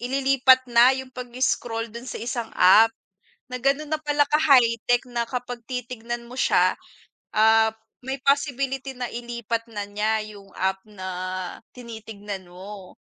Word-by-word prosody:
ililipat 260 Hz, 0 st, +3 dB
na 235 Hz, +2 st, +7 dB
yung 265 Hz, -1 st, -6 dB
pag-scroll 245 Hz, -2 st, -2 dB
dun 235 Hz, +2 st, -9 dB
sa -, -, -5 dB
isang 235 Hz, -1 st, -4 dB
app. 215 Hz, +5 st, +7 dB, 0.6 s
Na 250 Hz, -, -5 dB
ganun 280 Hz, +3 st, +1 dB
na 310 Hz, -, 0 dB
pala 295 Hz, -1 st, +2 dB
ka-high-tech 250 Hz, -5 st, +3 dB
na 235 Hz, -1 st, -1 dB
kapag 245 Hz, 0 st, -5 dB
titignan 240 Hz, -1 st, -5 dB
mo 250 Hz, -, -10 dB
siya, -, -, +3 dB, 0.6 s
ah, 220 Hz, +1 st, +5 dB, 0.3 s
may 265 Hz, +1 st, -4 dB
possibility 275 Hz, -1 st, 0 dB
na 250 Hz, -1 st, -4 dB
ilipat 235 Hz, -1 st, -4 dB
na 205 Hz, -1 st, -3 dB
niya 215 Hz, +1 st, 0 dB
yung 195 Hz, -1 st, -16 dB
app 190 Hz, 0 st, 0 dB
na 195 Hz, -3 st, -8 dB, 0.7 s
tinitignan 215 Hz, -5 st, -8 dB
mo. 185 Hz, +2 st, -11 dB
240 Hz, 135 wpm, -24 LUFS, 220-260 Hz, 0.7 s, na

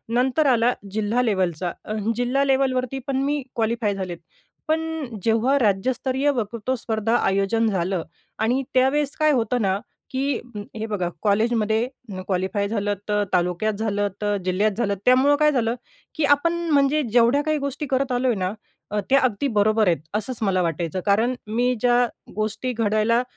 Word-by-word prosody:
नंतर 260 Hz, +5 st, +2 dB
आला 245 Hz, -1 st, +3 dB, 0.2 s
जिल्हा 220 Hz, +4 st, 0 dB
लेवलचा. 185 Hz, -6 st, 0 dB
अ, 215 Hz, -, -4 dB, 0.2 s
जिल्हा 250 Hz, +3 st, +1 dB
लेव्हलवरती 265 Hz, -1 st, +1 dB
पण 270 Hz, -1 st, 0 dB
मी 290 Hz, +1 st, 0 dB
क्वालिफाय 225 Hz, -2 st, 0 dB
झाले. 185 Hz, -3 st, -4 dB, 0.5 s
पण 315 Hz, +1 st, +2 dB, 0.4 s
जेव्हा 230 Hz, +5 st, +2 dB
राज्यस्तरीय 255 Hz, +6 st, +1 dB
वक्तृत्व 235 Hz, +2 st, -2 dB
स्पर्धे 220 Hz, -2 st, -2 dB
आयोजन 225 Hz, 0 st, +2 dB
झालं 185 Hz, -2 st, 0 dB, 0.4 s
आणि 245 Hz, +5 st, +1 dB
त्यावेळेस 270 Hz, +3 st, +2 dB
काय 310 Hz, 0 st, +4 dB
होतं 245 Hz, -1 st, +1 dB
ना, 195 Hz, -2 st, +1 dB, 0.3 s
की 270 Hz, +2 st, 0 dB, 0.2 s
अ, 210 Hz, -, -4 dB, 0.2 s
हे 220 Hz, -, -3 dB
बघा 190 Hz, -5 st, -2 dB
कॉलेजमध्ये 220 Hz, +2 st, +1 dB, 0.4 s
क्वालिफाय 190 Hz, +2 st, -1 dB
झालं 205 Hz, -1 st, -1 dB, 0.2 s
तर 210 Hz, 0 st, +2 dB
तालुक्यात 180 Hz, +4 st, +1 dB
झालं 205 Hz, -1 st, -1 dB
तर 205 Hz, 0 st, +1 dB
जिल्ह्यात 200 Hz, +4 st, +2 dB
झालं. 205 Hz, -4 st, +1 dB
त्यामुळं 260 Hz, +3 st, +5 dB
काय 300 Hz, -, +5 dB
झालं, 235 Hz, -3 st, 0 dB, 0.4 s
की 310 Hz, -, -1 dB
आपण 335 Hz, +4 st, -1 dB, 0.2 s
म्हणजे 285 Hz, +1 st, +3 dB
जेवढ्या 240 Hz, +4 st, +4 dB
काही 310 Hz, 0 st, 0 dB
गोष्टी 280 Hz, +1 st, -3 dB
करत 265 Hz, 0 st, +1 dB
आलो 250 Hz, +1 st, +1 dB
आहे 235 Hz, -5 st, +1 dB
ना, 185 Hz, +1 st, -1 dB, 0.4 s
अ, 210 Hz, -, 0 dB
त्या 275 Hz, -, +6 dB
अगदी 255 Hz, +1 st, 0 dB
बरोबर 215 Hz, 0 st, +3 dB
आहेत 170 Hz, -6 st, +2 dB, 0.2 s
असंच 230 Hz, +3 st, -3 dB
मला 190 Hz, -3 st, +2 dB
वाटायचं. 165 Hz, +1 st, -2 dB
कारण 225 Hz, +5 st, +2 dB
मी 245 Hz, +4 st, +1 dB
ज्या 245 Hz, 0 st, +4 dB, 0.3 s
गोष्टी 215 Hz, +4 st, -2 dB
घडवायला 220 Hz, +1 st, +2 dB
230 Hz, 160 wpm, -23 LUFS, 205-260 Hz, 0.5 s, त्या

